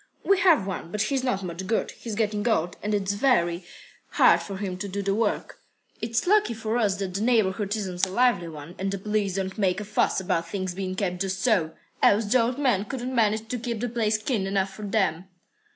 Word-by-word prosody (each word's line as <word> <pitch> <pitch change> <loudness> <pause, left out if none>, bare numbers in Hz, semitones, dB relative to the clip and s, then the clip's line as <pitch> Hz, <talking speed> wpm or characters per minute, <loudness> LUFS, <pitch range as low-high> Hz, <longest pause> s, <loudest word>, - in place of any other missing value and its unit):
"We 395 -1 +3
have 330 - +5
one, 185 -3 -5
but 210 +1 0
he's 265 +2 -1
not 200 -7 -1
much 180 +1 -5
good. 225 - 0
He's 225 -3 -7
getting 210 0 0
old, 175 -6 +1
and 210 0 0
it's 200 -1 0
very 190 -7 +2 0.5
hard - - +5
for 195 -1 -6
him 190 -2 -3
to 200 - -3
do 200 +1 -3
the 195 0 +1
work. 215 0 -1 0.4
It's 225 +1 -1
lucky 405 - +3
for 220 +2 -1
us 205 -4 +2
that 195 -2 -4
the 195 - -2
neighbourhood 210 -3 +1
isn't 190 -3 -1
a - - -7
lively 235 -4 +2
one 155 +1 -9
and 195 +1 -1
the 200 - -2
police 205 -1 -1
don't 190 +1 -3
make 190 -1 +2
a 210 - -5
fuss 210 - +1
about 170 -2 -1
things 185 -1 -3
being 185 0 -4
kept 180 -2 -2
just 190 -1 -2
so, 185 -10 +2 0.3
else 210 +2 +4
the 240 +4 +3
old 240 +3 0
man 245 -9 +1
couldn't 255 +3 -4
manage 220 -2 +1
to 250 - -2
keep 235 -1 -3
the 245 +2 -2
place 220 -2 +1
clean 215 -3 -1
enough 195 0 0
for 210 +1 -7
them." 190 -5 0
205 Hz, 225 wpm, -26 LUFS, 190-225 Hz, 0.5 s, have